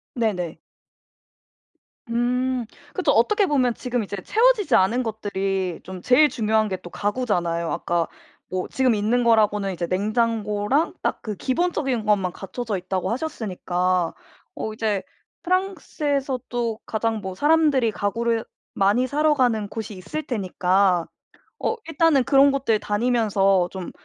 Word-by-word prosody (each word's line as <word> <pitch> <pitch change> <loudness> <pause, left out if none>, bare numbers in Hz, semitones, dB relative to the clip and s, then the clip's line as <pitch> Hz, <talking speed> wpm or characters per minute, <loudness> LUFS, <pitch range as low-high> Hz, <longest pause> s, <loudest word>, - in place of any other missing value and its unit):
네네. 185 -8 -1 1.5
음 250 +1 0 0.3
그쵸. - - +1
어떻게 420 -1 +3
보면 255 -7 +2
지금 245 -3 -2
이제 200 0 -6
채워지지 430 - +3
않은 230 +7 +3
것들이 195 -4 -2
좀 185 -1 -8
제일 255 +8 +5
중요한 220 -3 +1
게 190 - -4
또 175 - -8
가구잖아요. 175 -7 -1
아까 170 -1 -1 0.4
뭐 185 0 -2
지금 260 -2 +2
있는 230 +4 +1
거라고는 210 -3 +3
이제 170 -1 -3
냉장고랑 215 - 0
딱 - - -1
그 215 -2 -4
기본적인 265 - -1
것만 195 -4 +1
갖춰져 215 +1 -4
있다고 185 0 -3
하셨으니까 185 - -1 0.4
어 220 - -4
이제 215 -3 -1 0.4
프랑스에서도 280 - -1
가장 220 0 -1
뭐 190 -2 -5
사람들이 295 -3 +3
가구를 225 +3 -1 0.3
많이 205 +6 +2
사러 300 +3 +2
가는 240 -7 +1
곳이 220 0 -6
있을 205 +11 -5
테니까 185 -4 +1 0.5
어 - - 0
일단은 325 -3 +3
그런 275 +1 +5
곳들 265 -6 +1
다니면서 205 -4 +2
좀 185 -2 -6
220 Hz, 290 characters per minute, -23 LUFS, 195-255 Hz, 1.5 s, 제일